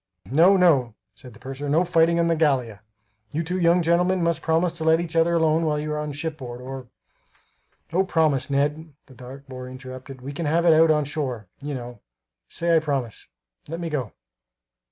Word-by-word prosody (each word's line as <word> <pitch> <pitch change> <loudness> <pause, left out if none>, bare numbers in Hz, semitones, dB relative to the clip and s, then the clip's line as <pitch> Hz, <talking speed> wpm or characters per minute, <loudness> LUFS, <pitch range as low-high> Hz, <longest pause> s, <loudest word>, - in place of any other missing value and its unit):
"No, 170 +9 +5
no," 140 - +3 0.2
said 125 -3 -13
the 110 - -16
purser; 135 +3 -6
"no 160 +5 +3
fighting 170 -1 +3
on 170 - +3
the 165 0 +2
Gallia. 130 -9 0 0.5
You 155 +8 -2
two 180 +3 -3
young 175 0 +3
gentlemen 175 +2 +2
must 170 -1 0
promise 165 +1 +1
to - - -3
let 160 0 +4
each 170 -1 -4
other 165 +1 +3
alone 160 0 +2
while 155 -2 0
you 150 +1 -3
are 150 - -2
on 150 0 -4
shipboard 145 -5 -6
or" 130 0 -8 1.1
"O, 185 +3 +3
promise, 155 -7 +1
Ned," 145 +2 -1
the 130 - -17
dark 130 +2 -11
boy 130 -1 -8
interrupted, 130 0 -10
"we 135 +3 -6
can 155 +2 -3
have 170 +3 +2
it 165 - +7
out 160 +1 +5
onshore, 145 -6 -1 0.2
you 145 0 -4
know! 120 -2 -8 0.5
Say, 170 0 +1
I - - +6
promise, 135 -7 -3 0.4
let 165 +2 -5
me 170 -2 -4
go." 130 -8 -3
150 Hz, 195 wpm, -24 LUFS, 130-165 Hz, 1.1 s, it